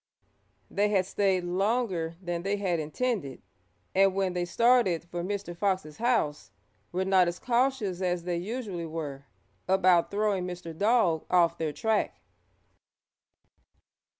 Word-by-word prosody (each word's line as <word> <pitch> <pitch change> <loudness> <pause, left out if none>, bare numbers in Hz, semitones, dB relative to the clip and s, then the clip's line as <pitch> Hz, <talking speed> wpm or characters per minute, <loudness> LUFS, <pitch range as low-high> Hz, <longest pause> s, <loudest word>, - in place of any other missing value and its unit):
They 205 +1 +2
had 195 -3 +2
stayed 190 -1 +1
longer 185 -2 0
than 175 -2 -3
they 200 +3 -1
had 185 -4 0
intended, 155 - -3 0.5
and 195 0 +4
when 190 -2 0
they 175 0 -1
started 230 -4 +3
for 175 0 -5
Mr. 195 -2 -4
Fox's 185 -5 -1
house 190 - 0 0.4
were 185 +2 -1
not 190 -2 +4
as 175 +1 -2
cautious 240 -7 0
as 180 -2 0
they 175 -1 -2
usually 195 -3 -4
were 145 -4 -6 0.4
about 185 -2 +4
throwing 200 -3 0
Mr. 175 -2 -7
Dog 200 -5 +2
off 170 -2 +3
their 160 -2 -1
track. 215 +8 0
185 Hz, 130 wpm, -28 LUFS, 170-205 Hz, 0.5 s, and